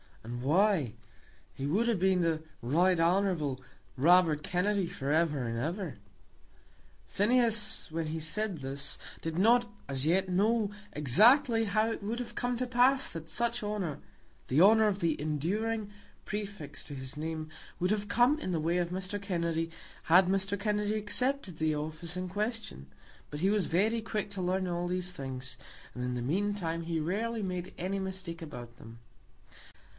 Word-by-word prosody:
"And 120 +2 -5
why? 160 - +2 0.6
He 135 - -4
would 205 +10 +2
have 230 -6 +1
been 190 0 +3
the 165 -2 +1 0.2
Right 170 +9 +3
Hon. 170 -6 +1 0.4
Robert 160 +1 +5
Kennedy 185 +1 0
for 140 -3 -3
ever 150 -4 +2
and 115 -1 -2
ever." 165 - -3 1.1
Phineas 220 -3 +1
when 160 0 -2
he 160 +1 -3
said 190 +3 -2
this 140 +1 -4 0.2
did 165 0 -3
not 235 +4 +4 0.2
as 135 0 -1
yet 185 +4 +2
know 210 +3 +2 0.2
exactly 225 - +5
how 215 +2 +1
it - - -4
would 220 +4 -3
have 245 - -5
come 245 0 -1
to 255 - -1
pass 255 +2 +3
that 165 -1 -7
such 235 +1 -1
honour, 205 -8 -3 0.5
the 140 +5 +3
honour 220 +3 +7
of 200 -1 -1
the 165 -3 +1
enduring 205 +9 -1 0.3
prefix 200 -9 -5
to 145 - -7
his 130 0 -7
name, 155 0 -4 0.3
would 180 +2 +1
have 210 -1 0
come 245 +8 +3
in 185 - -4
the 170 - 0
way 165 +3 +1
of 175 -1 0
Mr. 190 +3 -4
Kennedy 170 -4 -1 0.3
had 180 +3 +6
Mr. 195 +1 0
Kennedy 210 0 0
accepted 215 - 0
the 155 -1 +1
office 160 +3 -4
in 185 0 -3
question; 210 - -3 0.4
but 150 +1 -6
he 190 +2 +3
was 210 -3 +1
very 215 +7 +2
quick 215 -2 -3
to 200 -2 -4
learn 185 +1 0
all 175 0 -2
these 180 0 -1
things, 130 -5 -6 0.4
and, 125 - -5
in 125 0 -2
the 120 - -3
meantime, 170 +1 -1
he 165 -1 -1
rarely 215 +7 -1
made 180 -1 -4
any 190 +3 -2
mistake 185 -3 -5
about 120 -7 -9
them. 115 0 -12
180 Hz, 165 wpm, -31 LUFS, 155-210 Hz, 1.1 s, honour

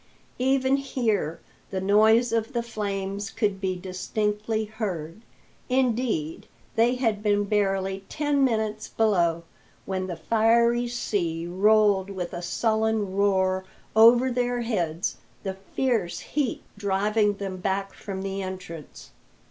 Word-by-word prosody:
Even 265 +1 +3
here 225 - -1 0.3
the 190 - -2
noise 220 +5 +4
of 225 +3 0
the 235 -1 0
flames 200 -2 -3
could 205 -4 -1
be 190 -1 0
distinctly 210 +4 -2
heard. 205 -5 -5 0.5
Indeed, 240 - 0 0.3
they 235 +3 +3
had 225 -5 0
been 205 -1 +2
barely 195 -2 0
ten 290 -2 +1
minutes 220 -3 0
below 170 -7 +1 0.4
when 185 -1 -2
the 175 - -4
fiery 235 +4 +3
sea 175 -8 -2
rolled 200 +1 +3
with 185 -3 -5
a 175 - -4
sullen 220 +1 0
roar 190 -2 +2 0.3
over 240 +3 +7
their 245 0 0
heads, 175 -8 -1 0.3
the 195 -2 -2
fierce 195 0 -1
heat 290 -5 -2 0.2
driving 205 +1 +1
them 195 -2 -5
back 195 +1 -2
from 190 -2 -6
the 195 0 -3
entrance. 185 -5 -8
210 Hz, 125 wpm, -26 LUFS, 190-230 Hz, 0.5 s, over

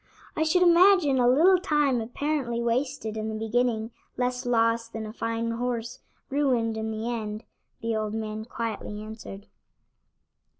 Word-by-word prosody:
"I - - -1
should 320 +3 +3
imagine 345 -5 +5
a 245 - +4
little 350 +8 +5
time 295 -8 +1
apparently 245 0 -2
wasted 235 -1 -1
in 220 0 -3
the 220 - -4
beginning 225 0 0 0.3
less 250 0 -1
loss 230 -1 +2
than 225 -1 -6
a 215 - -7
fine 230 0 -2
horse 235 0 -3 0.3
ruined 250 -6 +1
in 220 0 -3
the 220 +1 -4
end," 215 -1 -4 0.4
the 230 0 -1
old 215 0 -2
man 220 0 -4
quietly 220 -2 -5
answered. 215 -2 -9
230 Hz, 145 wpm, -27 LUFS, 220-265 Hz, 0.4 s, imagine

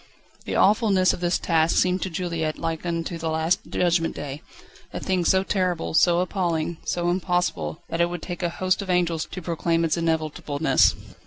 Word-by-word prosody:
The - - -3
awfulness 200 -3 +4
of - - -5
this 175 0 +1
task 165 -1 +1
seemed 185 0 +2
to 190 - -2
Juliette 165 -3 -2
like 165 +1 -3
unto 170 0 -3
the 160 0 -2
last 160 +2 +1
Judgment 170 -2 +1
Day; 145 +1 -6 0.5
a - - -5
thing 185 -2 0
so 190 +2 +3
terrible, 185 -4 -1
so 175 +2 +4
appalling, 170 -3 -1
so 175 0 0
impossible, 180 -3 -1
that 165 - -1
it 170 - +2
would 175 -1 -6
take 175 0 -5
a 175 - 0
host 185 +3 0
of 195 - -7
angels 170 -3 +1
to 185 - -7
proclaim 165 0 0
its 165 - 0
inevitableness. 160 -2 +1
170 Hz, 180 wpm, -24 LUFS, 165-180 Hz, 0.5 s, awfulness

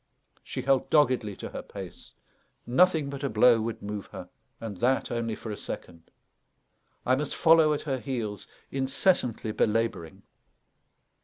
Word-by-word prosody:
She - - -5
held 135 -1 +2
doggedly 130 -9 +3
to - - -7
her - - -6
pace; - - -9 0.5
nothing 160 +3 +3
but 140 0 -6
a 140 - 0
blow 115 +1 +5
would 115 -1 -4
move 105 -1 -5
her, - - -9 0.3
and 110 -4 -6
that 130 +6 +1
only 115 -2 -2
for 110 - -7
a - - -3
second. 85 -4 -8 1.0
I 130 - +4
must 145 +1 -3
follow 160 -2 +5
at 150 - -1
her 135 -4 -2
heels, 110 -5 -4 0.2
incessantly 130 - 0
belabouring. 105 -7 -1
120 Hz, 145 wpm, -28 LUFS, 110-140 Hz, 1.0 s, blow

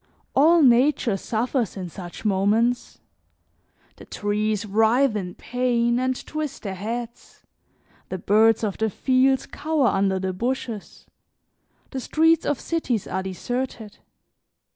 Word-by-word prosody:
All 320 +4 +5
nature 245 -3 +4
suffers 230 +2 -2
in 185 -2 -5
such 175 +3 -10
moments; 215 +5 +1 1.0
the - - -12
trees 210 0 -1
writhe 225 +4 +3
in 180 -4 -4
pain 240 -1 0
and 255 0 -2
twist 305 -3 -5
their 195 -3 -4
heads; 230 +5 -6 0.7
the 185 - -3
birds 220 +4 +3
of 205 -3 -2
the 220 0 +1
fields 260 +4 +2
cower 305 -5 0
under 195 -1 +1
the 190 0 -2
bushes; 235 0 -4 0.9
the 270 - -3
streets 325 +4 +2
of 290 - 0
cities 265 - -2
are 190 - -3
deserted. 220 +3 -5
230 Hz, 120 wpm, -23 LUFS, 205-260 Hz, 1.0 s, All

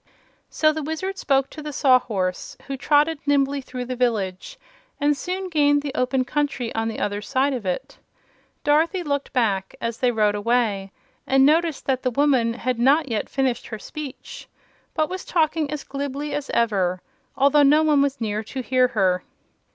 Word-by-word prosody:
So 310 -1 +2
the 315 - -3
Wizard 320 +6 -4
spoke 270 -1 +1
to 310 - -8
the 300 0 -5
Sawhorse, 230 -10 +1
who 275 - -4
trotted 295 +3 +2
nimbly 280 -1 +2
through 255 -1 -6
the 255 +1 -4
village 210 -7 -2 0.4
and 290 +1 +2
soon 370 +6 -4
gained 290 -4 +2
the 285 -2 -4
open 255 +1 0
country 275 -4 -2
on 225 0 -1
the 225 - -4
other 205 0 -2
side 270 +4 0
of 235 -7 -4
it. 180 - -4 0.6
Dorothy 325 +5 +2
looked 285 -2 -2
back, 200 -7 0
as 230 0 -4
they 250 - +3
rode 210 -3 +2
away, 205 -3 0 0.4
and 270 0 +5
noticed 320 +1 +2
that 260 -1 0
the 255 - 0
woman 255 -3 +2
had 250 -1 -2
not 275 +4 +3
yet 220 -3 -2
finished 265 -3 -1
her 220 - -6
speech 295 +3 -9 0.5
but 310 -1 +1
was 370 +2 -5
talking 315 -3 0
as 300 -1 -4
glibly 285 +1 -4
as 290 -1 -3
ever, 190 -6 +1 0.4
although 280 +2 +5
no 295 +2 +5
one 300 -2 +4
was 280 0 0
near 215 -1 -2
to 260 +4 -5
hear 255 0 +3
her. 185 -2 +2
270 Hz, 175 wpm, -23 LUFS, 230-295 Hz, 0.6 s, and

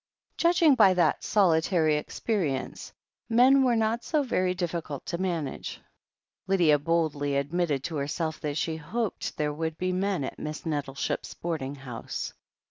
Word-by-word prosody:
Judging 335 -3 +4
by 190 -7 +6
that 170 -4 +2
solitary 165 -4 +3
experience, 150 - -2 0.4
men 255 +4 +6
were 245 -2 +3
not 225 +1 0
so 305 -3 +1
very 185 -8 0
difficult 170 -5 -4
to 170 -2 -3
manage. 170 -7 -3 0.7
Lydia 170 -6 +4
boldly 150 -3 0
admitted 145 -1 0
to 160 0 -3
herself 155 +3 -2
that 150 -1 -3
she 160 0 -1
hoped 215 +8 -3
there 150 -1 0
would 160 +1 -3
be 185 0 -1
men 190 -3 0
at - - -6
Miss 155 +2 -5
Nettleship's 145 -4 -3
boarding 150 -5 -3
house. 130 -4 -6
165 Hz, 140 wpm, -27 LUFS, 150-190 Hz, 0.7 s, by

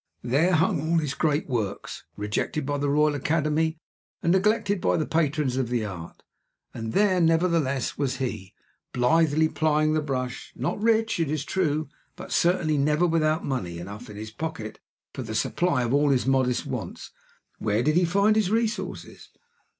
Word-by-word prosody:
There 145 +10 +2
hung 155 -2 +2
all 165 +2 +1
his 150 -4 0
great 150 +1 0
works, 110 -7 -4
rejected 105 +8 -2
by 145 0 -1
the 145 0 0
Royal 150 +1 +3
Academy, 155 +2 0 0.5
and 170 - +3
neglected 205 +1 +2
by - - +2
the 155 - 0
patrons 150 -5 0
of 125 -3 -1
Art; 100 -8 -4 0.5
and 110 0 -5
there, 190 -3 +3
nevertheless, 165 -5 +1
was 135 -2 -1
he, 110 -8 -4 0.4
blithely 155 +5 +3
plying 155 0 +1
the 155 - +1
brush; 130 -3 -4
not - - -3
rich, 225 -2 +2
it 165 -4 0
is 150 -1 -2
true, 155 -5 0 0.3
but - - -10
certainly 170 -4 +2
never 150 +4 +2
without 160 -1 +1
money 105 -11 -3
enough 100 +7 -8
in 105 - -9
his 110 +1 -7
pocket 115 -6 -6 0.3
for - - -5
the - - -5
supply 170 -8 +1
of 120 +1 -1
all 145 +1 +3
his 130 -3 +2
modest 130 -2 +1
wants. - - -6 0.5
Where 110 +2 0
did 155 +3 +2
he 180 - +4
find 200 +5 +3
his 215 -4 +2
resources? 225 +1 -3
150 Hz, 165 wpm, -26 LUFS, 130-165 Hz, 0.5 s, he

